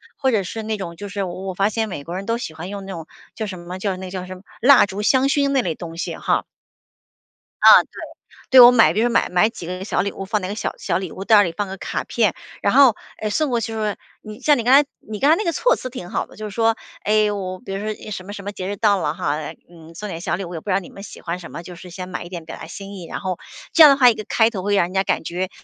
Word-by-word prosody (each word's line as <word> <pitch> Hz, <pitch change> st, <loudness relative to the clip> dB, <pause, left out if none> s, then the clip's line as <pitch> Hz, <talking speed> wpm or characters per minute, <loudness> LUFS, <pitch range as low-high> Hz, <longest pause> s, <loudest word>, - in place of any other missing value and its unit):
或 265 Hz, -1 st, +1 dB
者 215 Hz, -4 st, +1 dB
是 220 Hz, +4 st, -6 dB
那 215 Hz, 0 st, -2 dB
种 175 Hz, -4 st, -6 dB
就 205 Hz, +4 st, -8 dB
是 200 Hz, 0 st, -3 dB
我 185 Hz, 0 st, -6 dB
我 190 Hz, -, -3 dB
发 195 Hz, +3 st, +1 dB
现 220 Hz, 0 st, -2 dB
美 145 Hz, -7 st, -6 dB
国 170 Hz, +4 st, -6 dB
人 195 Hz, +1 st, -5 dB
都 230 Hz, +2 st, 0 dB
喜 200 Hz, -9 st, -6 dB
欢 160 Hz, +3 st, -7 dB
用 200 Hz, -1 st, -6 dB
那 195 Hz, -, -7 dB
种 165 Hz, -2 st, -8 dB, 0.3 s
叫 220 Hz, -, -3 dB
什 190 Hz, -3 st, -7 dB
么 175 Hz, +1 st, -7 dB
叫 190 Hz, -1 st, -2 dB
那 185 Hz, 0 st, -7 dB
叫 185 Hz, -1 st, -5 dB
什 185 Hz, 0 st, -8 dB
么？ 185 Hz, -, -14 dB, 0.2 s
蜡 270 Hz, -1 st, +7 dB
烛 200 Hz, +1 st, -5 dB
香 260 Hz, +5 st, +3 dB
薰 280 Hz, 0 st, +2 dB
那 275 Hz, -2 st, +2 dB
类 170 Hz, -8 st, -2 dB
东 165 Hz, 0 st, -8 dB
西 170 Hz, -, -3 dB
哈。 -, -, 0 dB, 1.2 s
啊， -, -, +9 dB
对。 -, -, -27 dB, 0.7 s
对， -, -, +13 dB
我 240 Hz, 0 st, +10 dB
买 235 Hz, -3 st, +5 dB
比 -, -, 0 dB
如 240 Hz, -, +3 dB
说 -, -, -1 dB
买 -, -, +3 dB
买 180 Hz, +5 st, +3 dB
几 225 Hz, -7 st, -9 dB
个 185 Hz, +1 st, -5 dB
小 -, -, 0 dB
礼 200 Hz, +2 st, -2 dB
物 -, -, -6 dB
放 210 Hz, +2 st, 0 dB
那 185 Hz, -, -3 dB
个 200 Hz, -, -4 dB
小 -, -, -3 dB
小 170 Hz, -, 0 dB
礼 185 Hz, -3 st, -5 dB
物 190 Hz, -, -7 dB
袋 220 Hz, -, +5 dB
儿 205 Hz, -, +7 dB
里， 175 Hz, -, -2 dB
放 205 Hz, -, -1 dB
个 190 Hz, -, -6 dB
卡 -, -, -3 dB
片， 215 Hz, -6 st, +1 dB, 0.3 s
然 200 Hz, -, +1 dB
后， 265 Hz, -4 st, +7 dB, 0.3 s
诶， 215 Hz, -, -1 dB
送 300 Hz, +8 st, 0 dB
过 240 Hz, -, +1 dB
去 225 Hz, -, -4 dB
时 -, -, -4 dB
候， 215 Hz, -, -1 dB, 0.4 s
你 215 Hz, +1 st, -9 dB
像 290 Hz, +2 st, +4 dB
你 235 Hz, -, -2 dB
刚 250 Hz, +3 st, +4 dB
才 285 Hz, +1 st, +6 dB, 0.2 s
你 215 Hz, -1 st, -6 dB
刚 280 Hz, -, +3 dB
才 315 Hz, -, +7 dB
那 430 Hz, -, -1 dB
个 340 Hz, -, 0 dB
措 -, -, +2 dB
辞 -, -, -6 dB
挺 235 Hz, -9 st, -8 dB
好 -, -, -2 dB
的， -, -, -18 dB
就 215 Hz, 0 st, -5 dB
是 -, -, -11 dB
说： 225 Hz, -1 st, +3 dB, 0.3 s
“诶， 215 Hz, 0 st, +3 dB
我 185 Hz, -2 st, -4 dB
比 245 Hz, -, -9 dB
如 195 Hz, +1 st, -4 dB
说 215 Hz, -, -2 dB
一 215 Hz, -, -9 dB
什 195 Hz, -3 st, -5 dB
么 200 Hz, -, -8 dB
什 200 Hz, -, -7 dB
么 205 Hz, -, -4 dB
节 185 Hz, -2 st, -5 dB
日 205 Hz, -, -3 dB
到 210 Hz, -2 st, +3 dB
了 -, -, -1 dB
哈， 165 Hz, -3 st, -2 dB
呃， 150 Hz, -1 st, -5 dB, 0.2 s
嗯， 165 Hz, -1 st, -15 dB
送 210 Hz, +5 st, -6 dB
点 165 Hz, -, -5 dB
小 -, -, -1 dB
礼 195 Hz, -, -5 dB
物， 175 Hz, -, -8 dB
也 -, -, -4 dB
不 205 Hz, -, -8 dB
知 -, -, +2 dB
道 190 Hz, -, +3 dB
你 185 Hz, -, -12 dB
们 195 Hz, -, -11 dB
喜 -, -, -11 dB
欢 170 Hz, 0 st, -3 dB
什 170 Hz, -, -10 dB
么， -, -, -7 dB
就 180 Hz, +1 st, -10 dB
是 180 Hz, +1 st, -11 dB
先 180 Hz, +1 st, -7 dB
买 180 Hz, -, -5 dB
一 175 Hz, -, -10 dB
点 170 Hz, -3 st, -7 dB
表 -, -, -8 dB
达 -, -, -9 dB
心 200 Hz, 0 st, -9 dB
意。” 180 Hz, -3 st, -8 dB
然 -, -, -5 dB
后 185 Hz, -2 st, -3 dB, 0.4 s
这 330 Hz, -, +8 dB
样 300 Hz, -, +11 dB
的 275 Hz, -, +3 dB
话， 250 Hz, -3 st, +7 dB
一 -, -, +3 dB
个 215 Hz, -, -6 dB
开 225 Hz, -1 st, +4 dB
头 195 Hz, -5 st, -5 dB
会 205 Hz, +1 st, 0 dB
让 185 Hz, -, +3 dB
人 180 Hz, -, -9 dB
家 190 Hz, 0 st, +2 dB
感 -, -, -1 dB
觉， 180 Hz, +3 st, -3 dB
200 Hz, 350 characters per minute, -21 LUFS, 180-225 Hz, 1.2 s, 对